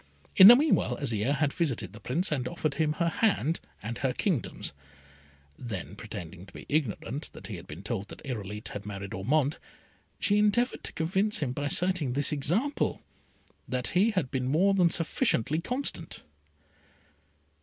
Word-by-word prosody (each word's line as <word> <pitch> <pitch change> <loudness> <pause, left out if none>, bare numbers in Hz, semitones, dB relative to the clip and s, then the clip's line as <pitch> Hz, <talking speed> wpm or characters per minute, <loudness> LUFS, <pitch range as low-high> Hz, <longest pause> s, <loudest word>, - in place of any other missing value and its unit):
In 190 - +11
the 240 - +12
meanwhile 295 +4 +2
Azire 125 0 0
had 145 -1 0
visited 130 - -2
the 110 - -11
Prince, 155 - -1
and 130 -4 -1
offered 150 +3 -2
him 150 +1 +1
her 170 +2 0
hand 170 -4 +1 0.2
and 115 +3 -5
her 135 -2 0
kingdoms; 165 - -2 0.9
then, 110 -8 -6
pretending 90 +3 -8
to - - -16
be - - -10
ignorant 145 -1 -2
that - - -11
he 105 - -6
had 85 +2 -12
been 80 +6 -9
told 105 -2 -3
that - - -12
Irolite 105 -5 -5
had 100 - -6
married 100 -1 -6
Ormond, 140 - 0 0.6
she 205 0 +3
endeavoured 210 +4 +1
to - - -5
convince 190 +6 0
him 140 -5 -1
by 145 +2 -2
citing 175 -4 +3
this 140 +1 +1
example, 180 - 0 0.6
that 125 -2 -1
he 195 +5 +3
had 185 - -1
been 130 -2 -1
more 180 +9 +3
than 180 -3 +4
sufficiently 160 - 0
constant. 250 - -3
145 Hz, 165 wpm, -28 LUFS, 115-180 Hz, 0.9 s, the